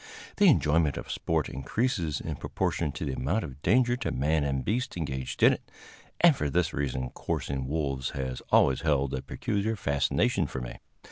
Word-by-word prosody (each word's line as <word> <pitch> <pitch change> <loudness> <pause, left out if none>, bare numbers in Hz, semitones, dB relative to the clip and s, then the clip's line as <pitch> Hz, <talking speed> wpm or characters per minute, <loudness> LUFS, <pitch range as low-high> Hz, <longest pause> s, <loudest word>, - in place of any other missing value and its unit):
The 205 - +6
enjoyment 80 - +3
of - - -6
sport - - 0
increases 85 - -1
in - - -5
proportion 75 -4 -1
to - - -4
the 70 - -2
amount 80 - -1
of 65 +1 -8
danger 120 +7 +3
to 125 - -2
man 75 +3 +1
and 70 -2 -1
beast 120 -1 -1
engaged 65 -6 -3
in - - +8
it, - - -8 0.5
and 170 -4 +6
for 75 - -1
this 85 +2 +1
reason 65 -2 -2
coursing 65 -2 -3
wolves 70 -3 -1
has 65 -2 -3
always 65 - +4
held 70 -4 +1
a 65 - -2
peculiar 105 +3 -2
fascination 70 -8 +1
for 65 - -5
me. - - -7
75 Hz, 180 wpm, -28 LUFS, 65-95 Hz, 0.5 s, in